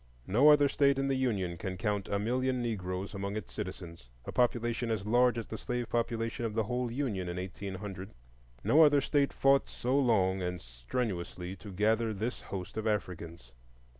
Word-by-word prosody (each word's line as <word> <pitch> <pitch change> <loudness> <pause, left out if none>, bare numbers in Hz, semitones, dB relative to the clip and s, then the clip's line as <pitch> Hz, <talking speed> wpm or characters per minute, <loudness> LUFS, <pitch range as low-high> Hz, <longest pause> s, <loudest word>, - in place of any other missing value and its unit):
No 125 +10 +5
other 145 -1 +7
State 140 0 +3
in 135 0 0
the 135 - +2
Union 100 -10 -1
can 95 +1 -4
count 105 -1 -1
a 100 - +1
million 125 +4 0
Negroes 95 -5 -3
among 100 +1 -3
its 110 - -6
citizens,—a 85 - -8
population 120 -1 +1
as 110 -3 -1
large 120 +2 +4
as 115 - -3
the 110 - -7
slave 125 -1 -3
population 115 0 -1
of 110 -2 -2
the 110 - +2
whole 125 +3 -2
Union 115 -9 -2
in 90 - -4
1800; 95 +1 -6 0.5
no 155 - +5
other 145 -1 +6
State 140 0 +1
fought 135 0 +3
so 125 +2 -1
long 100 -8 +3
and 90 0 -2
strenuously 90 - -4
to 100 +2 -10
gather 110 +3 +1
this 110 +5 -3
host 95 +1 -6
of 110 0 -1
Africans. 85 - -3
110 Hz, 175 wpm, -31 LUFS, 95-125 Hz, 0.5 s, other